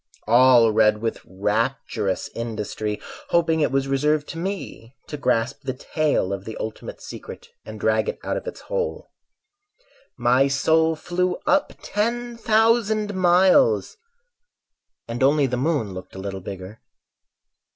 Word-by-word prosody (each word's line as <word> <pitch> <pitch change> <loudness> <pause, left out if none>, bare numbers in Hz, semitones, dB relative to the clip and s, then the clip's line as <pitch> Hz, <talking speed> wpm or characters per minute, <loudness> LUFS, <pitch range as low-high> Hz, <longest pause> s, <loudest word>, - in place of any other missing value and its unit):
All 120 0 +6
read 105 -1 +3
with 115 - -2
rapturous 105 +1 -1
industry 110 -2 -4 0.3
Hoping 165 -2 +2
it 150 - +2
was 135 0 0
reserved 150 +2 +1
to 165 - -6
me 170 - -6
To - - -6
grasp 125 -2 0
the 130 - -4
tail 145 - 0
of 95 -1 -5
the 110 +2 -7
ultimate 110 0 -6
secret, 475 - -10 0.2
And - - -8
drag - - +1
it 475 - -4
out - - -2
of - - -5
its - - -7
hole. - - -4 1.1
My 125 +3 +3
soul 160 +4 +2
flew 180 +2 -1
up 290 0 +2
ten 235 +3 -2
thousand 220 -2 +2
miles 180 - +4 1.1
And 115 +2 -5
only 140 +2 +4
the 125 -1 -1
moon 135 - 0
looked 95 0 -9
a - - -7
little 95 0 -5
bigger. 95 +3 -8
135 Hz, 140 wpm, -23 LUFS, 110-180 Hz, 1.1 s, All